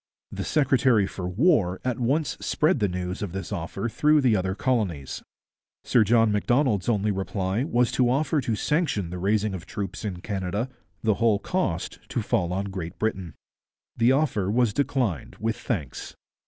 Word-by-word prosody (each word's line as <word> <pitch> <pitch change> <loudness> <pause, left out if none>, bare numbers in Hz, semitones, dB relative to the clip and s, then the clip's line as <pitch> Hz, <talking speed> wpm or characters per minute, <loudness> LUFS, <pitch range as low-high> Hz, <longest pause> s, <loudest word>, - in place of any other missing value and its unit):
The - - -4
secretary 130 -7 +3
for 90 -2 -5
war 100 - +2
at 125 -2 -1
once 130 +2 0
spread 155 -1 +1
the 105 - +2
news 90 0 -4
of 100 -5 -4
this 95 -2 -5
offer 95 +6 -3
through 150 +6 +3
the 125 -5 +4
other 95 -1 -1
colonies. 100 - -1 0.6
Sir 120 - +4
John 115 +1 +4
Macdonald's 110 -1 +1
only 105 -2 +1
reply 95 +2 -1
was 120 -5 +2
to 125 -2 +2
offer 145 +3 +1
to 115 -3 -1
sanction 110 - 0
the 90 - -5
raising 105 +2 +1
of 90 -3 -7
troops 100 +2 -5
in 95 -4 -4
Canada, 100 +4 -2 0.3
the 110 -1 +3
whole 115 -3 +4
cost 100 - -2
to - - -2
fall 85 0 0
on 100 +2 -2
Great 90 -2 -6
Britain. 95 -7 -2 0.6
The 115 +2 +4
offer 130 -9 +1
was 115 0 +2
declined 125 - -1
with 110 +2 -1
thanks. 80 - -4
105 Hz, 170 wpm, -25 LUFS, 95-125 Hz, 0.6 s, the